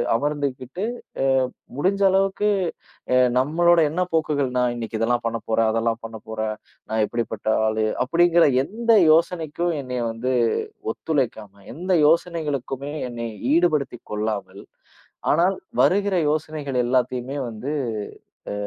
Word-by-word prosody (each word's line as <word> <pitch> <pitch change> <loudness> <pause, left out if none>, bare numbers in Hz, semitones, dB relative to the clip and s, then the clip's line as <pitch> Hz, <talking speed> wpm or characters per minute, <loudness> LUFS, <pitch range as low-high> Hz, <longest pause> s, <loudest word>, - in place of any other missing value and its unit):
அமர்ந்துகிட்டு 145 - -2 0.4
அ, - - +2 0.5
முடிஞ்ச 190 +6 +1
அளவுக்கு 195 +2 +2 0.9
நம்மளோட 170 +5 +3
என்ன 175 +4 -1
போக்குகள் 150 -4 +1
நான், 125 -1 +2
இன்னைக்கு 115 -1 -4
இதெல்லாம் 120 +1 0
பண்ணப்போறேன், 115 -1 0
அதெல்லாம் 115 0 0
பண்ணப்போறேன், 110 -1 -5 0.3
நான் 110 0 +1
எப்படிப்பட்ட 115 -3 -4 0.2
ஆளு 110 0 0 0.2
அப்படிங்கற 170 +4 +4 0.2
எந்த 225 +8 -9 0.3
யோசனைக்கும் 170 0 +1
என்னைய 125 -2 -3
வந்து 120 +3 -2 0.6
ஒத்துழைக்காம, 115 -9 -2 0.2
எந்த 180 +5 -3 0.2
யோசனைகளுக்குமே 145 -5 -1 0.2
என்னைய 115 -1 -5 0.2
ஈடுபடுத்திக் 155 -7 +1
கொள்ளாமல், 105 -2 -3 0.7
ஆனால் 175 +5 +3 0.3
வருகிற 200 0 +3 0.2
யோசனைகள் 150 -3 -3
எல்லாத்தையுமே 125 +2 0
வந்து 115 +5 -5 0.8
அ. - - -3
135 Hz, 105 wpm, -23 LUFS, 115-165 Hz, 0.9 s, அப்படிங்கற